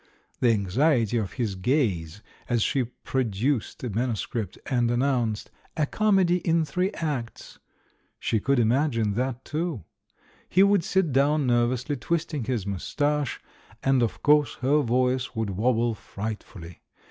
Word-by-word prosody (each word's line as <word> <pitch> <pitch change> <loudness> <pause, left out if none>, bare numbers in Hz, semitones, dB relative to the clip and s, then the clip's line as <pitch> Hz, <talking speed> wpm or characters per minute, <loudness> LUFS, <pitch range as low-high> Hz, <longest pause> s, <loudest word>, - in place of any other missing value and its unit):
The 125 - +3
anxiety 115 - +2
of 100 -5 -2
his 115 -6 -2
gaze 95 - -1 0.3
as 120 -3 +2
she 130 -3 +1
produced 125 0 -2
the 125 - -5
man 120 +5 0
uscript 110 0 -4
and 120 -2 +1
announced 120 -3 0 0.3
"A 155 - +2
Comedy 190 -1 +2
in 165 -1 +1
Tliree 180 +6 0
Acts," 140 -8 -5 0.6
she 110 - 0
could 140 +6 +1
imagine 115 -2 +2
that 125 +3 -2
too! 155 - -3 0.7
He 190 - +5
would 200 -3 +4
sit 190 -4 +1
down 140 +2 +2
nervously, 125 +3 +1
twisting 155 -3 -2
his 115 -5 -2
moustache, 145 - -1 0.4
and, 135 -1 +3
of 115 - -2
course, 150 -1 +4
her 145 +4 +3
voice 125 0 0
would 110 -3 -1
wobble 115 +3 +1
frightfully. 100 -5 -7
125 Hz, 135 wpm, -26 LUFS, 110-145 Hz, 0.7 s, He